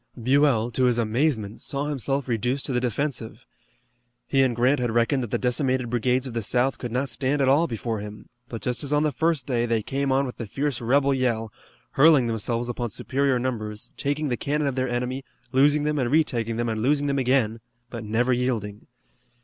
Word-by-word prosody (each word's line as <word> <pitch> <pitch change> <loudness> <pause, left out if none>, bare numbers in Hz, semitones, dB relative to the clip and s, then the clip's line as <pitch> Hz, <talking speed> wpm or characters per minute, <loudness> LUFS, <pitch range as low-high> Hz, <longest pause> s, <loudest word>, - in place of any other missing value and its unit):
Buell, 125 -2 +3
to 130 +2 +1
his 120 -1 +2
amazement, 115 -2 0
saw 140 +1 -2
himself 140 -1 -2
reduced 125 +3 -1
to 135 - -2
the 125 - +2
defensive. 125 -1 -3 0.8
He 135 - +3
and 130 -3 +2
Grant 125 +4 +3
had 120 -1 0
reckoned 120 +4 +1
that 120 - -4
the - - 0
decimated 130 -1 0
brigades 125 +2 +1
of 130 - -6
the 115 - -1
South 125 +5 0
could 120 - -5
not 130 +4 0
stand 135 +2 -1
at 135 - +2
all 145 +6 +4
before 115 -3 -3
him, 105 +1 -9 0.2
but 115 - -7
just 125 +3 -1
as 140 - -3
on 150 0 +3
the 155 - +1
first 160 -1 0
day 120 -3 0
they 115 -2 0
came 135 +3 -1
on 135 +1 +2
with 125 - -7
the 115 - -5
fierce 140 +3 -2
rebel 135 +4 +3
yell, 115 -5 -1 0.4
hurling 145 -2 +5
themselves 115 +1 -2
upon 120 -1 -3
superior 135 +5 0
numbers, 110 -4 -3
taking 145 +1 -1
the 120 - -1
cannon 150 +1 -1
of 140 - 0
their 130 0 -1
enemy, 125 +2 -2 0.3
losing 145 +2 +4
them, 150 0 0
and 125 -2 0
retaking 120 -6 +1
them 120 0 -1
and 110 -1 -2
losing 145 +4 +2
them 140 -1 0
again, 125 -4 +1 0.3
but 115 -2 -6
never 115 +4 +1
yielding. 115 -5 -2
125 Hz, 205 wpm, -25 LUFS, 115-140 Hz, 0.8 s, hurling